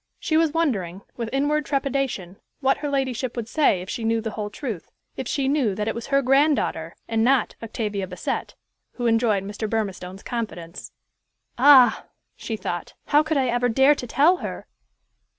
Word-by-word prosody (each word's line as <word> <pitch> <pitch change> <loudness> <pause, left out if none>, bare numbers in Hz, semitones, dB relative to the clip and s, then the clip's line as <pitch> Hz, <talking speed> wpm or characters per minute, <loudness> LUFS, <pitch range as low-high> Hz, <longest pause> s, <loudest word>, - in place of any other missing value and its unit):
She 315 - -1
was 320 -1 +3
wondering, 200 - -1
with 230 -2 -4
inward 290 +3 +1
trepidation, 270 -10 -2 0.2
what 270 -1 +2
her 295 0 -3
ladyship 260 -3 -1
would 230 -2 -3
say 230 - +2
if 185 - -11
she 235 - -4
knew 225 0 +1
the 220 0 -4
whole 210 -1 -4
truth, 210 - -6 0.3
if 260 - -5
she 270 0 0
knew 270 -8 +1
that 210 +1 -2
it 225 - 0
was 235 - -6
her 275 0 +2
granddaughter, 270 - +2
and 225 -1 +1
not 260 +2 +2
Octavia 210 -4 -3
Bassett, 180 0 -4 0.4
who 245 - -4
enjoyed 225 -4 +2
Mr. 210 +2 -5
Burmistone's 195 -4 -3
confidence. 190 -8 -5 0.7
"Ah!" 260 -2 +7 0.3
she 225 - -5
thought, 175 -3 -5
"how 295 - +6
could 310 -1 -1
I 265 - +2
ever 245 +1 +1
dare 265 +5 +5
to 250 -4 -6
tell 300 +10 +4
her?" - - -6
240 Hz, 175 wpm, -24 LUFS, 210-275 Hz, 0.7 s, Ah